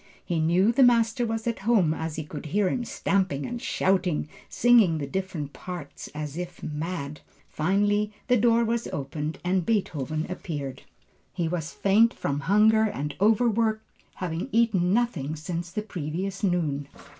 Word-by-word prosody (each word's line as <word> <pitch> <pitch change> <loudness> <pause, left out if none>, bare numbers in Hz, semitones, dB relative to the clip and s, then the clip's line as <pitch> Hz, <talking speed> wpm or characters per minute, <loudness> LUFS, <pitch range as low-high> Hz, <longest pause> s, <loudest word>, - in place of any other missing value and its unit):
He 170 -2 -1
knew 175 +7 +3
the 245 - +2
master 235 -1 +4
was 225 0 -3
at 235 -1 -1
home 195 -7 +3
as 160 -1 -4
he 155 - -3
could 150 0 -8
hear 200 +5 +1
him 245 +3 -2
stamping 190 -11 0
and 240 -1 -5
shouting, 185 -5 +1 0.2
singing 230 -9 +4
the 145 - -3
different 160 -2 -4
parts 175 -6 -8
as 150 0 -5
if 175 -1 -6
mad. 150 -1 -4 0.3
Finally 205 +5 +1 0.2
the 250 - +4
door 235 0 +4
was 235 +1 -1
opened 150 +3 -4
and 180 0 +1
Beethoven 155 - -1
appeared. 145 -7 -5 0.5
He 175 -3 -1
was 165 -1 -3
faint 220 +4 +3
from 140 0 -2
hunger 210 +7 +4
and 150 -8 -3
overwork, 220 0 +3 0.3
having 175 +5 -4
eaten 210 -6 +2
nothing 190 - 0
since 170 +2 -4
the 210 +4 -4
previous 185 +2 -4
noon. 155 -7 0
185 Hz, 155 wpm, -26 LUFS, 155-220 Hz, 0.5 s, master